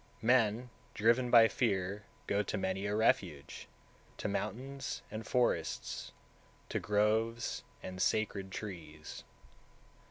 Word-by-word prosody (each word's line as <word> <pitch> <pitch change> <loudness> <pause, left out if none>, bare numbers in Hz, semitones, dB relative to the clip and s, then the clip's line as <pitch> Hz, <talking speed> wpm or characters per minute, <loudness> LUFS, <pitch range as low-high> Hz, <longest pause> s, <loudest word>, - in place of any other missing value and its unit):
188. - - -8 0.4
Men, 125 - -14 0.3
driven 115 +3 +3
by 115 -2 +8
fear, 100 -4 0 0.2
go 100 - +1
to 105 +1 -2
many 95 +1 -1
a 105 - 0
refuge, 90 -9 0 0.5
to - - -2
mountains 135 +4 -3
and 110 +1 -5
forests, 125 -1 0 0.6
to - - 0
groves 110 +2 +1 0.2
and 90 0 -5
sacred 100 -3 +1
trees. 85 -7 -7
105 Hz, 115 wpm, -34 LUFS, 95-115 Hz, 0.6 s, by